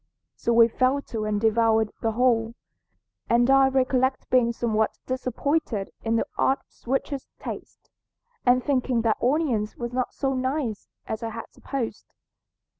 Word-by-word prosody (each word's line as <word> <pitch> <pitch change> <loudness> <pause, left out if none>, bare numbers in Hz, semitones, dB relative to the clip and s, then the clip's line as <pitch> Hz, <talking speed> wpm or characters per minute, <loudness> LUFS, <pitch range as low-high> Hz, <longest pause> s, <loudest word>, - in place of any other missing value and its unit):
So 235 - -1
we 230 0 +7
fell 255 +4 +1
to 225 -6 -5
and 210 -1 0
devoured 225 0 +3
the 225 -1 0
whole, 230 -1 +2 0.7
and 240 +1 +4
I 270 0 +6
recollect 260 0 +1
being 245 -2 +4
somewhat 220 -2 0
disappointed 255 -3 -1
in 225 0 +1
the 230 - +1
odd 270 - +3
sweetish 270 +2 -3
taste, - - -9 0.5
and 250 0 +4
thinking 255 -4 +1
that 225 -2 +1
onions 250 -6 +1
were 240 0 -3
not 250 +1 -2
so 270 -1 0
nice 260 -4 -2 0.2
as 220 - -4
I 230 - -3
had 230 0 -8
supposed. 265 -5 -5
240 Hz, 145 wpm, -25 LUFS, 225-260 Hz, 0.7 s, we